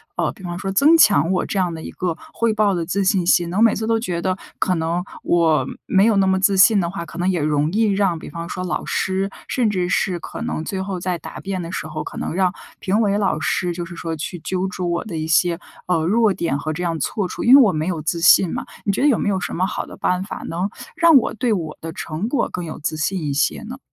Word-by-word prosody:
呃， - - 0
比 - - -17
方 175 0 -4
说 195 +1 -3
增 300 +11 +5
强 210 - +6
我 185 - 0
这 200 - -3
样 175 -2 0
的 160 - -7
一 - - -7
个 180 -3 -2 0.2
汇 230 -1 +1
报 210 -2 +2
的 170 -2 -2
自 195 +3 -1
信 190 -2 +2
心 175 -1 +3
呢？ 185 - -3
我 - - +3
每 230 -2 +5
次 220 - -3
都 225 0 +2
觉 175 -6 -3
得 185 0 -1 0.2
可 185 - +1
能 165 +2 -1 0.2
我 165 -3 +2 0.2
没 195 +2 +3
有 225 - +3
那 195 - +3
么 190 0 +2
自 195 +1 +3
信 205 +2 +6
的 170 -2 0
话 170 -2 -5
可 - - -11
能 180 +2 +1
也 180 -4 0
容 150 0 +1
易 225 +1 +2
让 195 -4 +1
比 - - -9
方 170 +2 -6
说 180 - -5
老 180 - -3
师， 190 +1 -1 0.2
甚 240 -5 +1
至 180 -3 -1
是 185 -2 0
可 - - -8
能 155 - -3
最 190 +3 -3
后 190 -2 -4
在 180 -1 -2
答 - - -9
辩 190 -2 -3
的 170 +1 -6
时 - - -3
候， 155 0 -5
可 - - -8
能 - - -3
让 185 -1 +1 0.3
评 200 +4 +1
委 205 -2 +2
老 195 -6 0
师 175 +4 -1
就 175 0 -5
是 175 0 -10
说 165 -1 -4
去 165 +3 -5
揪 185 +3 -2
住 185 -2 -3
我 170 0 -1
的 175 -8 -6
一 155 - -3
些， 170 +2 +2 0.3
呃， 165 -3 +1
弱 215 +1 +3
点 165 -6 -1
和 155 +2 -3
这 180 +3 -4
样 165 -2 -1
错 195 +7 -1
处， - - -5
因 250 +3 +8
为 280 - +9
我 205 -8 +4
没 155 +2 -2
有 170 -4 -2
自 165 +2 -2
信 170 +2 +6
嘛。 - - -4 0.2
你 200 - +2
觉 - - -1
得 290 - +4
有 255 - +4
没 - - -2
有 195 -2 0
什 - - -4
么 185 - 0
好 - - -4
的 - - -12
办 180 +1 0
法 200 - -7
能 180 +4 -2 0.3
让 330 -1 +5
我 240 - +1
对 235 +2 -1
我 165 -6 -4
的 165 - -5
成 165 +8 -4
果 250 -2 0
更 180 - -5
有 160 - -7
自 155 +1 -2
信 175 +3 -1
一 145 -2 -1
些 140 - 0
呢？ 250 +5 -8
185 Hz, 300 characters per minute, -21 LUFS, 170-200 Hz, 0.3 s, 为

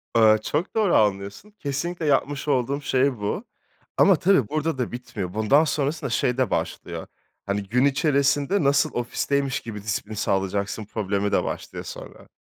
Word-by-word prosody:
Eee, 110 -1 +6
çok 160 +6 -2
doğru 215 -5 +3
anlıyorsun. 100 - 0
Kesinlikle 160 +4 -3
yapmış 145 0 +1
olduğum 140 +1 +1
şey 130 -1 +1
bu. 105 - -2 0.5
Ama 195 - +6
tabii 165 - +3
burada 155 -1 -1
da 125 - -2
bitmiyor. 105 -7 -6
Bundan 110 +9 +4
sonrasında 145 -1 -1
şey 125 +1 0
de 130 -5 +1
başlıyor, - - -3 0.4
hani, 100 0 -1
gün 125 +7 +2
içerisinde 140 +4 +2
nasıl 140 0 +3
ofisteymiş 135 +3 -1
gibi 105 -3 -7
disiplin 105 +1 -3
sağlayacaksın 100 0 -1
problemi 100 -1 -2
de - - +2
başlıyor - - -5
sonra. - - -10
130 Hz, 150 wpm, -24 LUFS, 105-145 Hz, 0.5 s, Eee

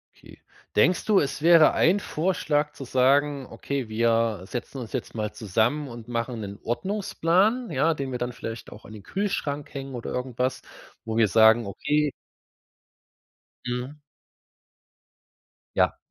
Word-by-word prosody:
Okay, - - -16 0.4
denkst 175 +12 +3
du, 210 -3 +4
es 140 +1 -2
wäre 165 -1 +7
ein 185 +5 +3
Vorschlag 155 -5 0
zu - - -8
sagen: 135 +2 +2
„Okay, 135 -5 -4
wir 115 -2 +1
setzen 120 +6 -6
uns 120 -4 -7
jetzt 130 -3 -4
mal 105 -1 -3
zusammen 115 +8 0
und 120 -2 -10
machen 115 -1 -3
'nen 100 -1 -7
Ordnungsplan, 195 - 0
ja, 155 +3 +2
den 135 -2 -4
wir 125 - -3
dann 125 0 -2
vielleicht 115 -2 -7
auch 105 - -12
an 105 - -11
den 105 - -10
Kühlschrank 150 -8 -3
hängen 135 -1 -6
oder 120 - -5
irgendwas, 125 0 -2 0.4
wo 110 0 -3
wir 115 -2 +5
sagen, 110 +3 +5
okay“ 150 +9 0 1.6
Mhm. 125 +3 -3 1.8
Ja. - - +2
130 Hz, 140 wpm, -25 LUFS, 115-150 Hz, 1.8 s, wäre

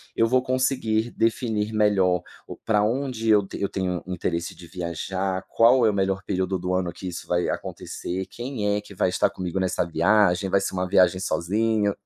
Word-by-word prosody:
eu 115 - +3
vou 130 +2 +3
conseguir 125 -3 0
definir 110 -2 0
melhor 95 -4 +3 0.3
o - - -7
pra 105 -2 +1
onde 120 0 -1
eu 105 -2 +5
eu 100 - -1
tenho 90 -2 -2
interesse 85 -2 -3
de 85 - -13
viajar. 95 +2 -3
Qual 120 +1 +5
é - - +5
o 105 - 0
melhor 95 -1 0
período 95 -1 -1
do 90 +1 -2
ano 90 -2 -1
que 95 - -8
isso 85 - -7
vai 90 0 0
acontecer? 95 +2 -4
Quem 120 -5 -2
é 105 - -3
que 100 -1 -14
vai 90 - +2
estar 90 - +2
comigo 90 0 -4
nessa 95 -1 0
viagem? 90 +3 +2
Vai 100 +1 +3
ser 95 - -3
uma 90 0 -1
viagem 90 -1 +4
sozinho, 105 +3 0
95 Hz, 190 wpm, -24 LUFS, 90-110 Hz, 0.3 s, eu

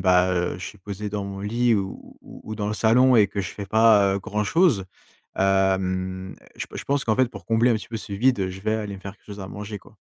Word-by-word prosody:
ben, 90 0 +4
heu, 90 0 -1
je 95 - -6
suis 105 - -9
posé 100 +2 -6
dans 100 -1 -3
mon 100 0 -6
lit 115 +3 +2
ou 95 -2 -5
ou - - -13
ou 110 - -5
dans 105 -1 -3
le 105 - -1
salon 125 +4 +4
et 105 -2 +6
que 100 0 -4
je 95 - -4
fais 100 - -7
pas, 105 -2 +5
heu, - - 0
grand 105 +1 -2
chose, 140 - +3 0.5
hem, 95 -1 0 0.2
je - - -5
p - - -10
je - - -6
pense 140 0 0
qu'en 110 - +1
fait, 130 0 +4
pour 120 - -11
combler 115 +2 +3
un - - +4
petit 110 - -5
peu 115 - -4
ce 110 - -8
vide, 125 +4 +2
heu, 95 -1 -1
je 95 +1 -9
vais 110 +2 0
aller 105 -2 -3
me 95 - -10
faire 100 +1 -8
quelque - - -34
chose 100 -1 -8
à 95 - -7
manger, 105 0 -6
quoi. 105 - -20
105 Hz, 280 wpm, -24 LUFS, 95-110 Hz, 0.5 s, et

